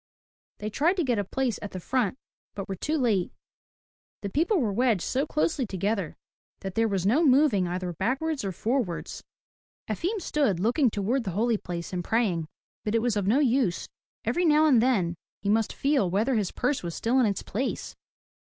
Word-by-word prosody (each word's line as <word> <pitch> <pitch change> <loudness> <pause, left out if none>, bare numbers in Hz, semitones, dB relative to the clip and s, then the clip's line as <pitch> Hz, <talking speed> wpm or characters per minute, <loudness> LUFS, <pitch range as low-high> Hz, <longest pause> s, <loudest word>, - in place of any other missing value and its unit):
They 215 +1 -5
tried 320 - +2
to 350 - +2
get 245 -6 +1
a - - +1
place 255 +4 -1
at 205 - -7
the 185 - -4
front, 250 +3 0 0.4
but 195 -2 -5
were 195 - -3
too 305 - -1
late. 220 - +1 0.9
The 200 - -3
people 340 - +2
were 220 -7 0
wedged 230 -4 +2
so 270 +3 0
closely 300 -4 0
together 195 -2 -2 0.5
that 195 -1 -5
there 225 +2 +2
was 195 -4 -1
no 255 +12 +4
moving 260 - +4
either 180 0 -3
backwards 275 - -1
or 195 - -2
forwards. 220 -2 -2 0.6
Efim 395 +5 -2
stood 285 - 0
looking 245 - +3
toward 225 +6 -1
the 200 - -3
holy 230 +1 +2
place 170 0 -6
and 180 -1 -2
praying, 185 -7 0 0.4
but 210 +1 -1
it 230 - +3
was 240 -3 +1
of 200 -2 -1
no 225 +6 +4
use. 255 -9 +1 0.4
Every 355 - +1
now 310 -2 +5
and 260 -7 +5
then 205 -9 +2 0.3
he 200 - 0
must 220 +1 +2
feel 275 -9 +1
whether 215 +9 +1
his 210 -6 0
purse 260 +3 -1
was 170 -2 -5
still 245 +3 +1
in 245 - +4
its 200 -2 -2
place. 255 +7 -3
225 Hz, 190 wpm, -27 LUFS, 195-270 Hz, 0.9 s, now